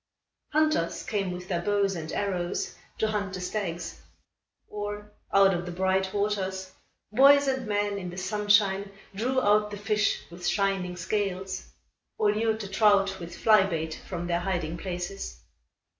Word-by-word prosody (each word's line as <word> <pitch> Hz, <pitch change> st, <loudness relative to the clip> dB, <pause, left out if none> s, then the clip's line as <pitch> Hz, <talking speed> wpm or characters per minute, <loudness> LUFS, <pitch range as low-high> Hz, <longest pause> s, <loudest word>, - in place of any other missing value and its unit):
Hunters 310 Hz, -, +1 dB
came 200 Hz, -3 st, -1 dB
with 180 Hz, 0 st, -7 dB
their 175 Hz, -3 st, -1 dB
bows 200 Hz, 0 st, +1 dB
and 160 Hz, -2 st, -5 dB
arrows 185 Hz, -3 st, -2 dB, 0.2 s
to 220 Hz, -, +1 dB
hunt 200 Hz, -2 st, -2 dB
the -, -, -5 dB
stags. 180 Hz, -2 st, -4 dB, 0.7 s
Or, 210 Hz, 0 st, -5 dB, 0.2 s
out 195 Hz, 0 st, +6 dB
of 175 Hz, 0 st, -3 dB
the -, -, -4 dB
bright 190 Hz, +1 st, +1 dB
waters, 190 Hz, -2 st, -1 dB, 0.4 s
boys 280 Hz, +4 st, +7 dB
and 260 Hz, -3 st, -1 dB
men 205 Hz, -1 st, 0 dB
in 180 Hz, -2 st, -5 dB
the 175 Hz, -, -9 dB
sunshine 200 Hz, 0 st, +2 dB, 0.2 s
drew 250 Hz, +6 st, 0 dB
out 210 Hz, -2 st, +3 dB
the 205 Hz, -, -6 dB
fish 210 Hz, 0 st, +1 dB
with 175 Hz, +1 st, -5 dB
shining 195 Hz, -3 st, 0 dB
scales, 190 Hz, 0 st, -2 dB, 0.5 s
or 210 Hz, -1 st, +3 dB
lured 220 Hz, +1 st, 0 dB
the 200 Hz, -, -5 dB
trout, 195 Hz, -1 st, +3 dB
with 175 Hz, 0 st, -8 dB
fly 215 Hz, -2 st, +6 dB
bait, 160 Hz, -3 st, -3 dB
from 175 Hz, -2 st, -4 dB
their 170 Hz, 0 st, 0 dB
hiding 175 Hz, -3 st, -2 dB
places. 180 Hz, +2 st, -5 dB
195 Hz, 155 wpm, -27 LUFS, 180-210 Hz, 0.7 s, boys